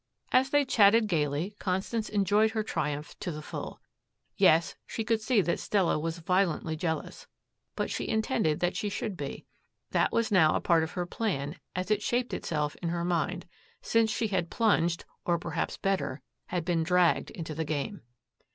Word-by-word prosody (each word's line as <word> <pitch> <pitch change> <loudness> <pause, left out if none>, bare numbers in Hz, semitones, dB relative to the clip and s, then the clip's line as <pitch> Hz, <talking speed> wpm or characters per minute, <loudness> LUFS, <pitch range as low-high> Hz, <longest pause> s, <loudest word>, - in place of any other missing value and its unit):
As 260 +1 +4
they 290 0 +3
chatted 220 -2 +5
gaily, 160 +1 -1
Constance 195 +4 -1
enjoyed 210 +2 +3
her 220 -1 0
triumph 150 -6 -3
to 180 - -3
the 150 -1 -7
full. - - -6 0.6
Yes, 165 +2 +4
she 225 - -3
could 220 0 +1
see 220 -1 +3
that 170 -2 -1
Stella 190 -6 +1
was 165 +2 -3
violently 170 -2 0
jealous. 160 0 -4 0.5
But - - -2
she - - -3
intended 220 - +1
that 175 0 +1
she 210 - -1
should 205 0 -3
be. 140 -4 -6 0.5
That - - +2
was 230 0 +1
now 160 -6 +5
a - - +2
part 170 -1 +3
of 160 0 -3
her 180 -1 -2
plan 175 -5 -3 0.2
as 185 +3 -2
it 210 -1 +2
shaped 245 +3 -1
itself 150 -2 -2
in 170 - -3
her 170 0 -1
mind, 175 +1 -1 0.4
since 225 -1 +3
she 220 +1 -1
had 180 -4 -1
plunged 175 -7 +1 0.2
or, 170 -1 +1
perhaps 165 -2 -3
better, 190 -9 -1 0.2
had 175 -2 -2
been 170 -2 +1
dragged 180 +1 +3
into 160 -2 -6
the 160 +2 -2
game. 155 +6 -3
180 Hz, 180 wpm, -29 LUFS, 160-210 Hz, 0.6 s, chatted